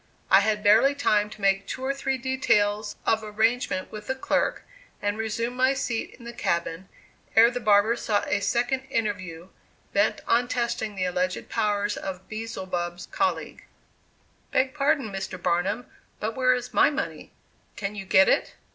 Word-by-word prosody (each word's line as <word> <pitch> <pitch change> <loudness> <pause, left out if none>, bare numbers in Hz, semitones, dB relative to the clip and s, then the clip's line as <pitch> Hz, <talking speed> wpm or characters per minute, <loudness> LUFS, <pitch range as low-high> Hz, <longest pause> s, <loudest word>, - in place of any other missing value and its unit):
I 195 - +9
had 210 +1 0
barely 225 +7 +5
time 210 -7 +2
to 210 - -12
make 195 0 +2
two 260 - -5
or 275 - +1
three 270 -1 -2
details 215 -5 +1
of 220 - +2
arrangement 220 -1 0
with 210 -1 -8
the 265 - -1
clerk, 265 - 0 0.4
and 205 0 -1
resume 225 +2 -2
my 260 +2 +3
seat 240 -4 -3
in 235 - -15
the 235 - -7
cabin, 170 0 -2 0.5
ere 230 +2 +7
the 245 - -3
barber 215 0 +4
sought 210 -3 -1
a 205 - +1
second 245 +5 0
interview, 200 -9 -3 0.4
bent 205 +1 +2
on 240 +1 +3
testing 235 -4 -2
the 185 -1 -1
alleged 180 0 -2
powers 210 -2 0
of 190 -1 -6
Beelzebub's 185 -6 -5
colleague. - - -2 0.8
"Beg 260 0 +1
pardon, 275 -5 +1
Mr. 190 -1 -5
Barnum, 190 +7 0 0.3
but 220 +1 -3
where 255 -1 +3
is 250 0 -6
my - - +5
money? 295 - -5 0.4
Can 200 -1 -4
you 205 -2 -6
get 190 0 +5
it?" - - +1
215 Hz, 165 wpm, -26 LUFS, 200-245 Hz, 0.8 s, I